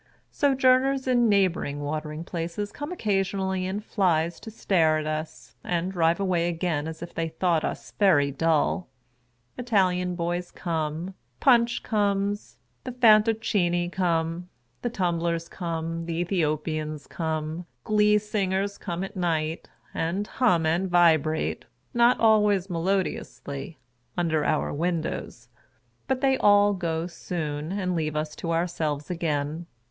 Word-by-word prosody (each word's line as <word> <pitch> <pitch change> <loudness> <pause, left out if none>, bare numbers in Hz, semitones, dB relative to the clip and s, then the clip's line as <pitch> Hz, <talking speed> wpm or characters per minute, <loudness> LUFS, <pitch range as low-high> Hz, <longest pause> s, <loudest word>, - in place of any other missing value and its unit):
Sojourners 265 -1 +3
in 240 -2 +3
neighbouring 180 -8 +1
watering 150 +2 -4
places 170 +4 -4
come 290 +3 -6
occasionally 195 - -1
in 195 +3 -3
flies 170 -6 0
to - - -9
stare 165 -7 +2
at 155 - -3
us, 155 +1 -5
and 175 +1 -1
drive 170 -1 +2
away 175 -3 +1
again 165 -3 -1
as 160 +1 -6
if 170 - -9
they 165 0 -2
thought 165 0 +1
us - - -4
very 155 -9 +4
dull; 165 +4 +1 0.7
Italian 185 -6 +1
boys 175 +1 -2
come, 165 +1 -3 0.3
Punch 240 -2 +4
comes, 205 -1 -1 0.3
the 255 - -5
Fantoccini 215 -6 +3
come, 170 -1 -1 0.3
the 240 - -1
Tum 180 -7 -1
blers 170 0 -1
come, 165 -1 -4
the 165 - -2
Ethiopians 155 -3 -1
come; 160 +1 -3 0.2
Glee 210 0 +4
singers 200 -1 -1
come 175 -1 -4
at 195 - -7
night, 165 -3 -1 0.2
and 175 +5 -1
hum 190 -7 +2
and 175 +4 +1
vibrate 160 -3 +2 0.3
(not 240 +1 +4
always 210 -4 +3
melodiously) 165 -5 -3 0.4
under 160 -3 +1
our 155 - 0
windows. 160 -6 -3 0.6
But 260 -1 0
they 270 -1 +3
all 205 0 +5
go 165 -3 -2
soon, 160 -3 -4
and 190 -2 -1
leave 155 -2 -1
us 155 0 -2
to 165 - -3
ourselves 165 -3 -1
again. 160 -1 -2
175 Hz, 130 wpm, -26 LUFS, 160-200 Hz, 0.7 s, all